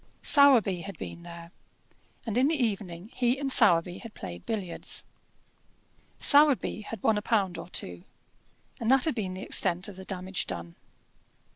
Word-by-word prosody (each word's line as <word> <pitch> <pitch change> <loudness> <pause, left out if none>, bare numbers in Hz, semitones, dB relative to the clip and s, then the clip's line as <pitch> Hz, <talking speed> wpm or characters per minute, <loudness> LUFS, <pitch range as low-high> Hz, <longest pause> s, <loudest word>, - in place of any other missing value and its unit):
Sowerby 245 - +5
had 195 -1 -9
been 170 - -9
there, 170 0 -12 0.7
and 225 -3 -4
in 255 +3 +3
the 320 - 0
evening 200 -4 -4
he 245 +1 0
and 275 -1 -3
Sowerby 180 -6 +3
had 230 -2 -12
played 90 -1 -10
billiards. 195 -6 -1 1.1
Sowerby 285 -7 +3
had 215 -1 -9
won 215 -2 +2
a - - -9
pound 200 -5 -1
or - - -10
two, 90 - -2 0.8
and 230 - -2
that 265 -1 +3
had 315 - 0
been 195 -6 -5
the 190 - -8
extent 180 +1 +3
of 200 -3 -11
the 190 - -10
damage 185 0 -4
done. 85 0 -6
200 Hz, 160 wpm, -27 LUFS, 175-240 Hz, 1.1 s, Sowerby